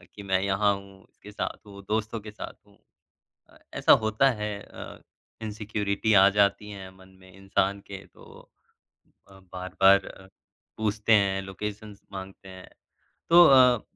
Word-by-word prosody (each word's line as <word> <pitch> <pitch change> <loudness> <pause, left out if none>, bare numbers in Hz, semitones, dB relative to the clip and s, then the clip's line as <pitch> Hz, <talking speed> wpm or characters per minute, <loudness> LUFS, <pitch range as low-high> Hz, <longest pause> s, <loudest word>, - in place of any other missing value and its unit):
कि 105 - -9
अ, - - -12
मैं 95 -1 +1
यहाँ 100 +1 +1
हूँ, 100 0 -14
इसके 105 - -15
साथ 105 - -4
हूँ, 100 -1 -12
दोस्तों 110 +1 -2
के 105 0 -10
साथ 105 - -9
हूँ। 100 - -24 0.7
अ, - - -21 0.2
ऐसा - - +5
होता 110 +5 +2
है 105 -3 -4
अ, - - -11 0.4
इनसिक्योरिटी 105 -1 -2
आ 95 0 +7
जाती 100 +1 +2
है 95 -2 -9
मन 95 0 -19
में 95 0 -18
इंसान 95 0 -1
के 95 0 -9
तो - - -17 0.8
अ, 95 0 -16
बार-बार 95 +1 +3
अ, 95 - -13 0.5
पूछते 110 0 0
हैं, 100 -2 +2
लोकेशन्स 105 +2 -8
माँगते 95 0 -9
हैं। 95 -1 -12 0.6
तो 175 +1 +8
अ, 125 -4 +5
100 Hz, 155 wpm, -26 LUFS, 95-105 Hz, 0.8 s, तो